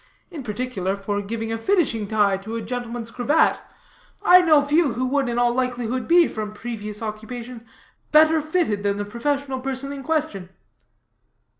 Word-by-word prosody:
In 320 -5 -6
particular, 210 -5 -3
for 205 +1 -3
giving 225 +2 -4
a 225 - -2
finishing 260 - +1
tie 205 -2 +2
to 215 +4 -7
a 230 - -3
gentleman's 240 0 -5
cravat, 290 +7 +2 0.7
I 365 +1 +8
know 310 -4 +5
few 290 -2 +2
who 250 +3 -1
would, 270 0 0
in 235 - -2
all 240 0 +3
likelihood, 250 -1 -2
be, 340 0 +6
from 215 -1 -5
previous 215 -1 -5
occupation, 230 +2 -7 0.4
better 315 +1 +5
fitted 310 - 0
than 200 0 0
the 205 - -3
professional 270 +4 -2
person 270 +1 -4
in 280 - -7
question." 290 - -2
240 Hz, 160 wpm, -23 LUFS, 215-285 Hz, 0.7 s, I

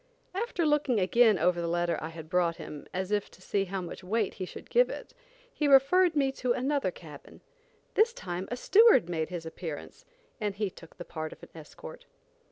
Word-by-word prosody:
After 385 -4 -1
looking 295 -6 +2
again 215 +3 +4
over 175 +1 +2
the 170 - -2
letter 175 0 0
I 155 - -4
had 160 -1 -9
brought 175 -1 +1
him, 155 -3 -9
as 185 +2 -3
if 205 -1 0
to - - -19
see 195 +1 -1
how 190 0 -4
much 175 +1 -8
weight 210 +2 0
he 185 - -5
should - - -11
give - - +4
it, - - -8 0.4
he 300 - 0
referred 310 +6 +5
me 275 -2 +2
to 250 -1 +1
another 270 -3 0
cabin. 155 -5 -12 0.5
This 445 +2 +4
time 180 - -5
a 245 - -3
steward 400 - +5
made 160 -2 -2
his 175 -2 -6
appearance 160 -2 -7 0.4
and 210 -3 -2
he 205 -2 -2
took 165 - -15
the 175 - -8
part 155 -1 -5
of - - -19
an - - -11
escort. 155 -2 -11
190 Hz, 200 wpm, -29 LUFS, 170-270 Hz, 0.5 s, referred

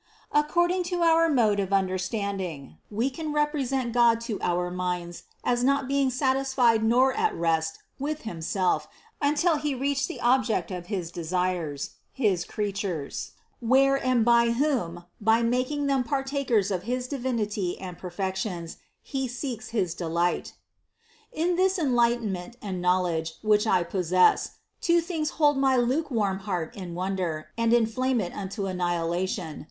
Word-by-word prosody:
According 345 +5 +2
to 350 -1 -1
our 330 0 +5
mode 220 -8 +3
of 195 -1 -2
understanding, 185 - -2
we 230 +6 0
can 310 +3 -4
represent 275 -5 0
God 235 -1 +5
to 230 -3 -4
our 180 0 0
minds 180 -1 -3 0.2
as 245 0 +1
not 275 0 +2
being 275 -1 +2
satisfied 260 -3 +2
nor 250 +4 +4
at 440 0 0
rest 160 -1 0 0.2
with 300 +2 -3
Himself 175 -4 -1 0.3
until 300 +3 +2
He 295 -1 -2
reached 275 +1 0
the - - -7
object 245 -4 +2
of 180 -1 -6
his 185 -6 -3
desires, 175 -4 -2 0.2
the 200 -9 +2
creatures, 195 -7 -3 0.3
where 265 +3 +4
and 250 -3 +2
with 235 0 +4
whom, 230 - -1 0.2
by 225 +2 +3
making 255 +5 0
them 275 -2 +2
partakers 270 -5 0
of 185 -2 -1
his 250 +3 -2
divinity 220 -9 -2
and 180 -2 -7
perfections, 185 -1 -4 0.3
He 265 -2 -2
seeks 245 -1 -5
his 195 -7 0
delight. 170 0 -1 0.8
37. 330 +3 0
In - - +1
this 380 +1 +3
enlightenment 235 - +1
and 190 -5 -4
knowledge 175 -3 +1
which 210 0 +3
I 180 -4 +3
pos 180 -1 -3
sess, 185 0 +4 0.3
two 340 0 +4
things 325 -2 -2
hold 295 -2 +4
my 265 -1 +3
lukewarm 240 -6 +1
heart 180 -5 -3
in 180 -4 -7
wonder 180 -4 -2
and 230 0 +1
inflame 240 +2 +2
it 180 -4 -3
unto 195 0 -4
annihilation. 175 -1 -2
225 Hz, 145 wpm, -26 LUFS, 180-265 Hz, 0.8 s, our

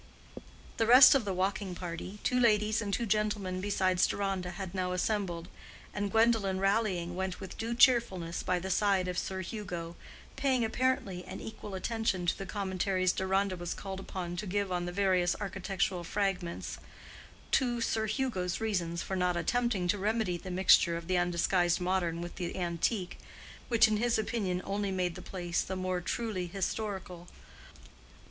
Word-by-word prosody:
The 225 - +2
rest 250 +2 +10
of 270 -6 +2
the 200 - -1
walking 190 0 -1
party—two 185 +8 -3
ladies 215 -1 +3
and 205 -2 -3
two 235 +4 0
gentlemen 210 -3 0
besides 185 -2 +2
Deronda—had 190 -2 -3
now 180 -1 -1
assembled; 180 -3 -1 0.5
and 205 -1 -2
Gwendolen 220 -3 +3
rallying, 195 -4 +1
went 190 0 -3
with 190 - -8
due 230 +1 -3
cheerfulness 230 -10 +3
by 180 - 0
the 190 +2 -4
side 195 -1 +2
of 180 -1 -1
Sir 190 -1 -3
Hugo, 175 -4 -5 0.4
paying 260 -4 +2
apparently 220 -6 0
an - - -7
equal 210 -2 -7
attention 205 -2 -1
to 175 - +2
the 195 - -7
commentaries 190 -2 0
Deronda 190 0 0
was 175 -1 -4
called 190 -1 -6
upon 180 -2 -5
to 205 +3 -4
give 200 0 -1
on 175 -1 -1
the - - -3
various 185 -2 +2
architectural 190 -2 -2
fragments, 185 -2 -2 0.7
to 245 -2 +2
Sir 220 -1 0
Hugo's 215 -6 -1
reasons 175 -6 -1
for 190 - -3
not 180 -1 +1
attempting 235 -2 0
to 205 +1 +1
remedy 215 -2 0
the 180 +2 -7
mixture 180 -2 +5
of 170 - -7
the 180 +1 +1
undisguised 175 0 +2
modern 180 -2 0
with 175 0 -7
the 175 -1 -4
antique—which 185 +5 -1
in 215 -1 +1
his 235 +2 +2
opinion 205 -5 -1
only 200 0 -1
made 180 -2 -1
the - - -9
place 175 -2 -2
the 190 - -4
more 185 -1 -2
truly 190 -2 -2
historical. 190 -1 -4
190 Hz, 160 wpm, -31 LUFS, 180-210 Hz, 0.7 s, rest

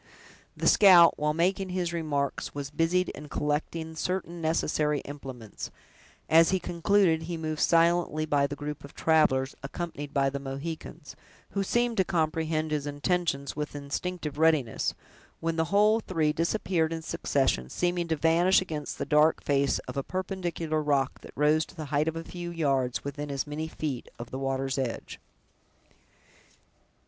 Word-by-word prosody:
The - - 0
scout, 180 -5 +8
while 150 0 +1
making 185 +3 +1
his 180 -2 -2
remarks, 145 -5 -2
was 140 -1 -5
busied 175 +4 +1
in 150 0 -9
collecting 160 +3 -2
certain 175 0 -3
necessary 155 -2 +1
implements; 130 -6 -8 0.6
as 165 +1 +6
he 190 - +2
concluded, 175 -1 +2
he 165 +1 -4
moved 155 -1 -3
silently 170 -2 +3
by 145 -2 +2
the 145 - -5
group 150 0 -6
of 140 - -12
travelers, 145 -4 +3
accompanied 145 0 -5
by 135 -1 +2
the 140 - -3
Mohicans, 140 +2 -7 0.4
who 200 - -1
seemed 240 +4 +1
to 190 - +4
comprehend 160 -2 -1
his 150 -1 -1
intentions 145 -1 -1
with 150 0 -4
instinctive 150 +1 -4
readiness, 155 -8 +2 0.4
when 165 0 -1
the 160 0 +1
whole 210 +5 +4
three 160 -8 0
disappeared 165 -1 0
in 165 -1 -4
succession, 130 - 0
seeming 175 - -1
to 160 - +1
vanish 165 +5 +4
against 155 -6 -5
the - - -3
dark 150 +1 +3
face 140 -1 +2
of - - -6
a - - +1
perpendicular 175 -3 -2
rock 140 -3 0
that - - -12
rose 150 +2 +3
to - - -17
the 155 -2 -5
height 150 +2 +2
of 160 - -1
a 165 - -4
few 175 0 -6
yards, 135 -7 0
within 145 +1 -5
as 140 -1 -2
many 155 +2 -4
feet 145 -6 -4
of 120 - -8
the 130 - -4
water's 135 0 -1
edge. 125 -3 -4
155 Hz, 160 wpm, -28 LUFS, 145-170 Hz, 0.6 s, scout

